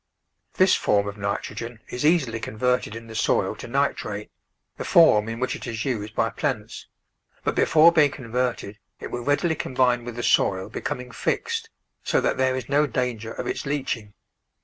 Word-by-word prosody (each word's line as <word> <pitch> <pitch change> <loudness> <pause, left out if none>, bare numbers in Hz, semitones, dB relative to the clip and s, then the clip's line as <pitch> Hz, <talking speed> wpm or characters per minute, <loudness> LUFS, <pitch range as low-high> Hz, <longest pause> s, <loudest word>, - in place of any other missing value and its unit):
This 185 0 +5
form 100 -1 +2
of 100 - -5
nitrogen 110 +3 -4
is 125 - -4
easily 145 -8 +2
converted 125 0 -1
in 115 0 -8
the 115 - -10
soil 110 - +1
to - - -8
nitrate, - - -2 0.5
the - - -4
form 115 -11 +5
in 115 +1 -5
which 130 - -1
it - - -8
is 115 -1 -3
used 110 -4 -3
by 115 - +1
plants, 125 -8 -3 0.6
but - - 0
before 160 +1 +6
being 155 -4 +5
converted 125 -5 -3 0.2
it - - -7
will 120 - -3
readily 145 +6 +1
combine 125 -4 +1
with 120 -1 -7
the 120 - -4
soil 95 -4 +2
becoming 125 0 -5
fixed, 455 - -2 0.3
so - - +2
that - - 0
there 130 0 +2
is 130 -3 -4
no 145 +2 +3
danger 115 -3 -2
of - - -5
its - - -3
leaching. 120 -7 -3
125 Hz, 175 wpm, -24 LUFS, 110-140 Hz, 0.6 s, before